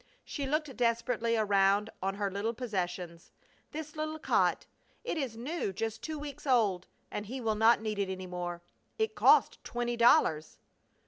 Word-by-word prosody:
She 280 -3 -4
looked 300 -1 -1
desperately 230 -1 +1
around 200 0 +3
on 195 +1 -1
her 200 -1 -1
little 210 +4 -2
possessions. 180 -7 -4 0.4
"This 305 0 -7
little 310 0 -3
cot! 315 - +1 0.4
It - - -2
is 265 -8 -3
new 265 - -3
just 220 +3 -4
two 315 -1 -4
weeks 290 -1 -7
ago 215 -8 +3 0.3
and 210 - -4
he 260 +4 -5
will 225 -3 0
not 220 +2 +4
need 215 -2 -2
it 195 -1 0
any 185 0 -5
more. 175 -1 -5 0.3
It 440 0 0
cost - - +4
twenty 240 0 -2
dollars!" 160 -9 +4
225 Hz, 165 wpm, -31 LUFS, 195-265 Hz, 0.4 s, not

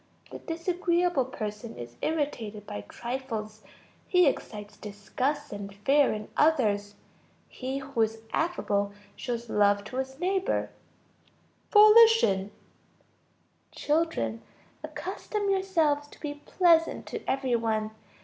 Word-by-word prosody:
The - - -7
disagreeable 345 -3 0
person 220 -2 -6
is 120 0 -8
irritated 235 -10 -2
by 105 - -6
trifles. 225 -4 -5 0.5
He 360 -1 +5
excites 210 -6 -2
disgust 235 +8 -3
and 200 -1 -6
fear 275 +8 +3
in 215 0 -5
others. 205 -10 +2 0.5
He 260 +1 -5
who 275 -3 -2
is 225 0 0
affable 205 -12 0 0.2
shows 235 -1 -4
love 205 -1 +3
to 250 +5 -7
his 265 +1 -4
neighbor. 380 +2 0 1.0
Volition. 425 - +6 1.2
Children, 290 - 0 0.4
accustom 410 -2 -3
yourselves 325 -7 +1
to - - -17
be 290 -1 -6
pleasant 335 -3 +3
to - - -6
every 265 -2 +1
one. 220 -2 -1
260 Hz, 110 wpm, -28 LUFS, 210-325 Hz, 1.2 s, Volition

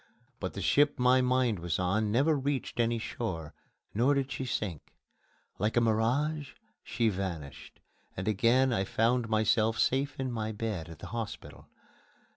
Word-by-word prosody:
But - - -4
the - - -5
ship 145 0 +3
my 125 +1 +4
mind 125 -5 +2
was 85 -1 -1
on 105 +4 0
never 140 +8 +3
reached 140 -2 -2
any 115 0 +2
shore, 95 -9 -4 0.4
nor 125 +7 +3
did 140 0 -1
she 130 - -3
sink. 100 - -4 0.6
Like 105 +4 0
a - - +8
mirage 130 +7 0 0.3
she 115 -3 0
vanished, 90 -8 -6 0.4
and 90 - -4
again 120 +5 +3
I 95 - +1
found 115 +3 +1
myself 110 +1 +2
safe 135 +2 +1
in 130 -1 -2
my 110 -2 -3
bed 105 -7 -4
at 80 - -10
the - - -9
hospital. 115 -2 -6
115 Hz, 155 wpm, -30 LUFS, 105-130 Hz, 0.6 s, a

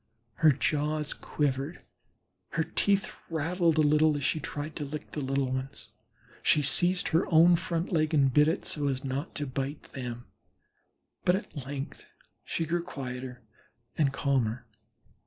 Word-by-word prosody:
Her 160 -2 +6
jaws 150 +2 0
quivered, 145 +2 -2 0.7
her 165 - +1
teeth 200 +4 0
rattled 165 +1 +1
a - - +5
little 150 0 +4
as 140 - -4
she 155 - +1
tried 145 +1 -5
to - - -3
lick 150 +2 -6
the 150 - -4
little 135 -1 0
ones; 130 +1 -5 0.5
she 150 - +3
seized 175 +6 +4
her 165 +4 +3
own 170 +2 +7
front 170 0 -2
leg 155 -2 +2
and 140 -4 +3
bit 150 +2 +5
it 160 - -1
so 145 -2 -1
as 135 -1 -1
not 135 +4 -4
to 145 - -2
bite 135 +2 -5
them, 120 -2 -6 1.0
but 180 - +4
at 145 -8 -6
length 140 0 -6 0.4
she 165 - -2
grew 170 +2 0
quieter 125 -4 -7 0.5
and 145 -4 +2
calmer. 130 -4 0
150 Hz, 155 wpm, -29 LUFS, 135-160 Hz, 1.0 s, own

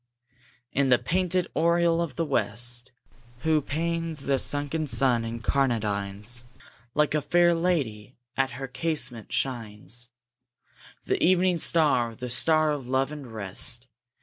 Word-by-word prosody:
in 140 -1 +1
the 125 - +6
painted 180 +2 0
oriel 170 0 +3
of 160 -7 -3
the 165 - 0
West, 120 -2 -1 0.5
Whose 155 0 +2
panes 165 0 -2
the 135 -1 +1
sunken 145 +3 -1
sun 125 -1 +3
incarnadines, 115 -2 -1 0.5
Like 150 -1 +2
a 150 - +2
fair 175 +4 +4
lady 140 -11 -1 0.2
at 135 -2 0
her 135 0 -5
casement, 130 -4 -2
shines 120 -1 -2 1.0
The - - 0
evening 180 0 +3
star, 135 -9 +3
the 125 +1 -5
star 155 +3 +3
of 140 -4 -4
love 130 +2 +1
and 145 -5 -8
rest! 110 +4 -1
135 Hz, 125 wpm, -27 LUFS, 120-160 Hz, 1.0 s, the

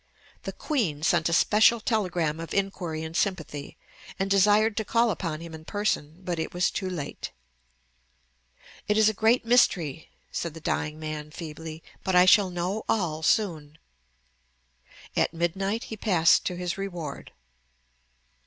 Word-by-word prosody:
The - - -3
Queen 195 - -2
sent 165 0 +2
a - - -1
special 215 +6 +5
telegram 180 -9 0
of 165 - -6
inquiry 180 -5 -2
and 160 +1 -7
sympathy, 160 -7 -2 0.4
and 195 0 -2
desired 210 +2 +4
to 220 - +1
call 230 +2 +2
upon 165 -5 -4
him 165 -1 -9
in 160 0 -9
person; 175 -4 -2
but 175 -2 -3
it 160 - -4
was 180 +1 +2
too 190 -2 -3
late. 165 -6 -5 1.6
"It 210 +1 +2
is 220 0 +6
a - - -2
great 225 +4 +2
mystery," 170 - +2 0.2
said 165 -2 -4
the - - -7
dying 155 0 -2
man 155 -1 -5
feebly; 160 0 -8 0.2
"but 190 - 0
I 180 0 +7
shall 190 +1 +6
know 180 +4 -2
all 170 -8 0
soon." 160 -5 0 1.4
At - - +1
midnight 195 +6 -1
he 220 - -7
passed 180 -6 +4
to 180 - -2
his 180 +1 -3
reward. 175 -7 -6
175 Hz, 150 wpm, -27 LUFS, 160-205 Hz, 1.6 s, I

